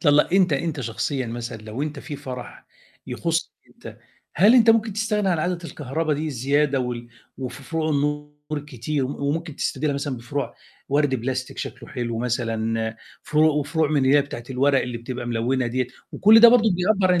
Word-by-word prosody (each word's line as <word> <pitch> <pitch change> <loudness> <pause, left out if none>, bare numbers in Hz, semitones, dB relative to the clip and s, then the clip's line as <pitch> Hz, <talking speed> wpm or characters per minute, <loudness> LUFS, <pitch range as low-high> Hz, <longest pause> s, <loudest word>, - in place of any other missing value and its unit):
طل 145 -3 +5
أنت 185 0 +2
أنت 150 +1 -1
شخصيُا 130 +3 -2
مثلًا 115 +1 -5
لو 110 +5 -5
أنت 150 -1 -4
في 145 - -7
فرح 125 -2 -8 0.4
يخصَّك - - -1 0.2
أنت، - - -12 0.4
هل 205 +9 +6
أنت 235 -2 +7
ممكن 225 -1 +2
تستغنى 210 -1 0
عن 175 -3 +1
عادة 175 +3 -1
الكهربا 155 0 -2
دي 150 +2 -3
الزيادة 140 +1 +1
وال 120 -1 -4 0.3
وفـي 130 0 -6
فروع 160 +2 -2
النور 150 0 -1 0.2
الكتير، 145 -1 -2
م 140 - -4
وممكن 150 +2 -3
تستبدلها 145 +1 -1
مثلًا 140 -1 -3
بفروع 120 +2 -4 0.3
ورد 145 -1 +2
بلاستيك 130 +1 -3
شكله - - -6
حلو 120 -2 -3
مثلًا، 115 -2 -1 0.3
فروع 155 +1 +3
وفروع 150 +1 0
من 145 -3 +2
هي 140 +2 +5
بتاعة 125 -4 -8
الورق 135 +1 +3
اللي 120 -1 -4
بتبقى 120 +1 -6
ملونة 120 +2 0
ديّة، 125 +1 -1 0.3
وكلّ 215 +4 +7
ده 235 - +11
برضه 230 -2 +5
بيعبّر 185 +1 +2
عن 175 - +2
140 Hz, 175 wpm, -23 LUFS, 125-160 Hz, 0.4 s, ده